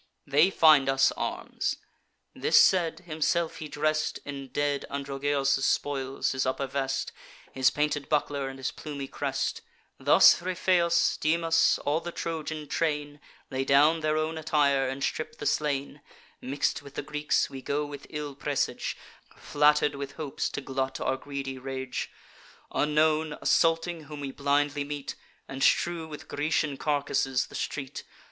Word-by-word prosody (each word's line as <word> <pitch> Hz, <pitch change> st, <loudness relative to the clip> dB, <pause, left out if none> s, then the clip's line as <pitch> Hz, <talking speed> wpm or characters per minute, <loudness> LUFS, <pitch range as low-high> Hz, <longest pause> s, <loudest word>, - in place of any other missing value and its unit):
They 150 Hz, +6 st, +4 dB
find 155 Hz, -7 st, +5 dB
us 135 Hz, 0 st, +4 dB
arms.' -, -, -3 dB, 0.6 s
This -, -, +4 dB
said, 175 Hz, -4 st, +3 dB
himself 165 Hz, 0 st, -1 dB
he 155 Hz, -, -6 dB
dress'd 155 Hz, +1 st, -1 dB
In 140 Hz, -1 st, -6 dB
dead 145 Hz, +1 st, -1 dB
Androgeos' 140 Hz, 0 st, 0 dB
spoils, 135 Hz, -2 st, 0 dB
his 130 Hz, 0 st, 0 dB
upper 130 Hz, +1 st, -1 dB
vest, 135 Hz, 0 st, -2 dB, 0.4 s
His 130 Hz, 0 st, +3 dB
painted 145 Hz, -1 st, -1 dB
buckler, 145 Hz, -2 st, 0 dB
and 135 Hz, -, -9 dB
his 130 Hz, -, -3 dB
plumy 140 Hz, -3 st, -6 dB
crest. -, -, -2 dB, 0.4 s
Thus -, -, +6 dB
Ripheus, 175 Hz, -1 st, +2 dB
Dymas, 165 Hz, +1 st, +3 dB
all 150 Hz, +2 st, +2 dB
the 175 Hz, -, -6 dB
Trojan 155 Hz, -2 st, -4 dB
train, 150 Hz, -2 st, -2 dB, 0.3 s
Lay 135 Hz, 0 st, -1 dB
down 145 Hz, +4 st, +4 dB
their 155 Hz, 0 st, 0 dB
own 160 Hz, +1 st, -1 dB
attire, 145 Hz, -4 st, +2 dB
and 135 Hz, +1 st, -4 dB
strip 155 Hz, +9 st, -3 dB
the -, -, -7 dB
slain. 145 Hz, -1 st, -1 dB, 0.4 s
Mix'd 140 Hz, +3 st, -1 dB
with 140 Hz, -1 st, -13 dB
the -, -, -3 dB
Greeks, 150 Hz, 0 st, 0 dB
we 135 Hz, -1 st, -7 dB
go 145 Hz, +3 st, -1 dB
with 145 Hz, -1 st, -9 dB
ill 150 Hz, -2 st, -5 dB
presage, 135 Hz, -, -2 dB, 0.4 s
Flatter'd 150 Hz, 0 st, +3 dB
with 140 Hz, -1 st, -6 dB
hopes 150 Hz, -4 st, -3 dB
to -, -, -5 dB
glut 135 Hz, -1 st, -3 dB
our -, -, 0 dB
greedy 135 Hz, -1 st, -6 dB
rage; 130 Hz, -1 st, -4 dB, 0.6 s
Unknown, 155 Hz, +1 st, +1 dB
assaulting 165 Hz, -1 st, +1 dB
whom 150 Hz, 0 st, -8 dB
we 140 Hz, -1 st, -4 dB
blindly 145 Hz, +1 st, +1 dB
meet, 145 Hz, -1 st, -5 dB, 0.3 s
And 135 Hz, 0 st, -7 dB
strew 170 Hz, +1 st, +2 dB
with 150 Hz, -2 st, -9 dB
Grecian 145 Hz, -1 st, -1 dB
carcasses 140 Hz, -3 st, 0 dB
the -, -, -17 dB
street. 135 Hz, -2 st, -4 dB
145 Hz, 145 wpm, -28 LUFS, 135-155 Hz, 0.6 s, Thus